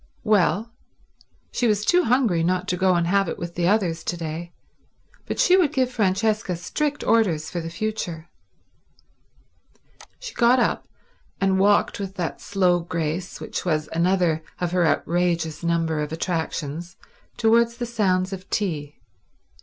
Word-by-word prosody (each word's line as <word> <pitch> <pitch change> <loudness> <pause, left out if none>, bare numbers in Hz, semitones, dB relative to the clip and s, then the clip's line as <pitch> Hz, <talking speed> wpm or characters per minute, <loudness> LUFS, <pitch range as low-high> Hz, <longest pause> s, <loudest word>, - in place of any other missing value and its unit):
Well, 215 0 +2 0.8
she 245 - +1
was 210 -1 +1
too 360 0 +4
hungry 230 -8 +2
not 185 +2 0
to 180 - +1
go 185 0 +3
and 170 -1 +1
have 195 +1 +2
it - - -4
with 170 0 -6
the 175 0 0
others 180 -5 +1
to 175 - -2
day, 165 +1 -5 0.8
but - - -3
she 365 - +5
would 350 -7 +3
give 260 -4 +1
Francesca 210 -2 0
strict 290 - -2
orders 180 -10 +2
for 175 - -3
the 165 - -5
future. 170 -3 -4 1.9
She - - -8
got 240 +1 +4
up, 245 - 0 0.5
and 190 -1 +2
walked 205 +1 +3
with 195 -1 -5
that 175 -4 -4
slow 185 -3 +2
grace 170 +1 -3
which - - -5
was 155 -3 -1
another 170 -1 +2 0.2
of 180 -1 -1
her 175 -2 +2
outrageous 170 -2 0
number 165 -2 0
of 150 0 -3
attractions 165 0 -3 0.4
towards 235 0 +3
the 240 - -3
sounds 195 -5 0
of 185 0 -8
tea. 150 -8 -2
180 Hz, 150 wpm, -23 LUFS, 170-215 Hz, 1.9 s, she